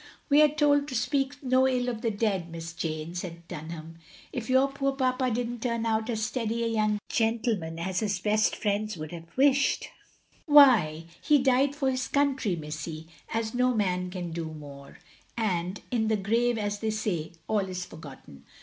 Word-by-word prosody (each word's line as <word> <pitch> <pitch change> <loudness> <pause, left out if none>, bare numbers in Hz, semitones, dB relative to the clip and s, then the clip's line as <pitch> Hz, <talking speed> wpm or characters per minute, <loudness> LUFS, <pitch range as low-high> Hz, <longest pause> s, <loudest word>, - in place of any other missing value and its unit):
"We 290 +1 +6
are 305 - +8
told 290 -1 +2
to 255 - -5
speak 275 +3 0
no 260 0 +4
ill 250 -1 0
of 235 -3 -3
the 235 - +1
dead. 200 -5 -1
Miss 165 0 -7
Jane," 160 0 -4
said 170 -2 -6
Dunham. 160 +1 -8 0.3
"If 240 -3 -4
your 260 +1 +5
poor 275 0 -1
papa 255 -1 +1
did 240 +1 -1
n't 240 -1 -6
turn 235 -2 -1
out 220 +1 0
as 220 -2 -1
steady 230 0 -2
a 230 - 0
yotmg 215 -1 +2
gentleman 225 -8 0
as 185 +2 -2
his 205 -3 0
best 215 +3 +1
friends 210 -1 -1
would 155 -1 -6
have 165 -1 -8
wished, 280 +1 +3 0.6
why 245 - +6 0.2
he 300 - +4
died 270 +1 +2
for 270 -3 +1
his 255 0 -2
country, 275 -9 +1
missy, 155 +1 -6 0.2
as 225 0 -2
no 250 0 +2
man 180 -3 0
can 180 -2 -5
do 165 0 -4
more 145 -3 -10 0.3
— - - -36
and 185 -4 -1
in 225 -3 +1
the 220 -1 +2
grave, 230 +4 +1
as 205 -1 -2
they 220 - -1
say, 205 -8 -2
all 215 - +2
is 180 -1 -4
forgotten. 140 - -12
220 Hz, 185 wpm, -28 LUFS, 170-255 Hz, 0.6 s, are